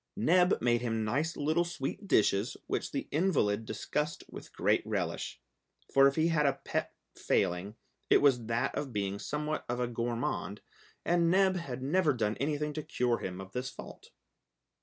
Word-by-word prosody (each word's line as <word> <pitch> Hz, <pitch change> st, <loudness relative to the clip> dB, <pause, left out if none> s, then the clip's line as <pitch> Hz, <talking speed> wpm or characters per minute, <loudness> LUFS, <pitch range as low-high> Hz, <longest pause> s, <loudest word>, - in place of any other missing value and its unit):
Neb 180 Hz, +2 st, +4 dB
made 120 Hz, -1 st, +3 dB
him 115 Hz, -2 st, -1 dB
nice 145 Hz, +9 st, -1 dB
little 155 Hz, +4 st, +2 dB
sweet 175 Hz, +3 st, -5 dB
dishes, 105 Hz, -, +2 dB
which -, -, -2 dB
the -, -, -3 dB
invalid 130 Hz, -, +1 dB
discussed 150 Hz, +2 st, -2 dB
with -, -, -10 dB
great -, -, +2 dB
relish, -, -, -3 dB, 0.5 s
for 135 Hz, 0 st, +7 dB
if 140 Hz, -, 0 dB
he 160 Hz, +1 st, +2 dB
had 150 Hz, -3 st, +3 dB
a 140 Hz, -, +3 dB
pet -, -, -2 dB, 0.2 s
failing 90 Hz, +5 st, 0 dB, 0.3 s
it -, -, +7 dB
was 125 Hz, -6 st, +3 dB
that 115 Hz, 0 st, 0 dB
of 145 Hz, -3 st, -3 dB
being 100 Hz, -1 st, -2 dB
somewhat 150 Hz, +4 st, -3 dB
of 120 Hz, 0 st, -1 dB
a 125 Hz, -, +1 dB
gourmand, 115 Hz, -4 st, -3 dB, 0.4 s
and 170 Hz, -1 st, +3 dB
Neb 190 Hz, +1 st, +4 dB
had 135 Hz, -8 st, -5 dB
never 155 Hz, +2 st, +2 dB
done 110 Hz, -3 st, 0 dB
anything 150 Hz, +1 st, -1 dB
to 155 Hz, -, -3 dB
cure 125 Hz, -6 st, 0 dB
him 90 Hz, 0 st, -5 dB
of 95 Hz, 0 st, -9 dB
this 125 Hz, +4 st, -3 dB
fault. -, -, -11 dB
135 Hz, 170 wpm, -31 LUFS, 115-155 Hz, 0.5 s, for